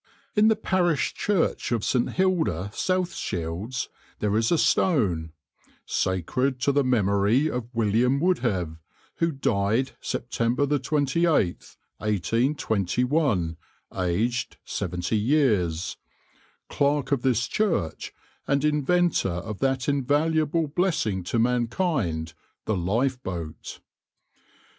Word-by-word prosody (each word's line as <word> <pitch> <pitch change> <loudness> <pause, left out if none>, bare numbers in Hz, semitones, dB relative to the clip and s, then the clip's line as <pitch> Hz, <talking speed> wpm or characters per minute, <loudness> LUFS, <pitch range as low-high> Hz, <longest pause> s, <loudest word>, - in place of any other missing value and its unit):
In 210 0 +5
the 220 - +5
parish 180 -8 +1
church 200 -10 0
of 115 -3 0
St. 125 -2 +1
Hilda, 160 - 0
South 185 +2 0
Shields, 95 - -3 0.3
there 105 -1 0
is 115 +1 +2
a 170 - +4
stone 95 - +2 0.5
"Sacred 125 - 0
to 140 - +3
the 140 0 +2
Memory 110 +3 +2
of 120 -1 -4
William 115 +3 +2
Wouldhave, 105 - 0 0.4
who 165 0 +1
died 115 -2 0
September 120 +3 -1
28, 145 - 0 0.2
1821, 110 - 0 0.4
aged 110 +7 -1
70 90 +4 -2
years, 105 - +1 0.7
Clerk 145 -1 0
of 140 -3 +2
this 125 -2 +1
Church, 165 - -1 0.4
and 140 +1 +1
Inventor 150 - +2
of 95 +4 -5
that 135 -1 0
invaluable 150 +3 +1
blessing 145 - 0
to 115 - -1
mankind, 115 - 0 0.3
the 110 - 0
Lifeboat." 95 - -3
125 Hz, 100 wpm, -25 LUFS, 100-150 Hz, 0.7 s, In